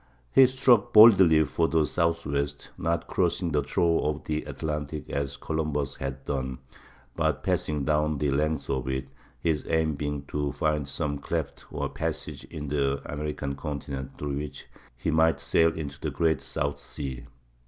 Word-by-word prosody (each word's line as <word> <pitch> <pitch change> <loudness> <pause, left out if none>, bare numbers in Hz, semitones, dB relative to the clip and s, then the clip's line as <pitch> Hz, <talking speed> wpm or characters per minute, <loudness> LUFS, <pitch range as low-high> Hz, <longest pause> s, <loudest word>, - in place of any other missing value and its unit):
He 135 -1 +8
struck 130 -4 +3
boldly 95 -8 +8
for 80 +2 +1
the 80 -1 +2
Southwest, 75 -4 -1
not 85 +1 -1
crossing 90 -1 0
the 75 -1 +2
trough 85 +4 +1
of 75 0 -1
the 75 0 -2
Atlantic 75 -1 -4
as 70 0 -2
Columbus 75 -1 -2
had 65 0 -5
done, 65 -2 -2 0.6
but - - 0
passing 75 -2 0
down 75 0 +1
the 70 0 0
length 75 +3 0
of 65 -1 -2
it, 65 0 -2 0.3
his 80 -3 0
aim 80 -1 +2
being 75 0 -3
to 75 -2 -1
find 75 -2 0
some 70 0 -2
cleft - - -4
or - - -2
passage - - -4
in 75 -2 -7
the 70 -1 +1
American 75 -1 -3
continent 70 -2 -5
through 70 -1 -3
which 75 -1 -6 0.3
he 75 +6 -1
might 80 -1 +3
sail 80 0 +3
into 70 -3 -6
the - - -2
Great 80 -5 +1
South 70 +1 -2
Sea. 65 -5 -6
75 Hz, 160 wpm, -27 LUFS, 70-80 Hz, 0.6 s, He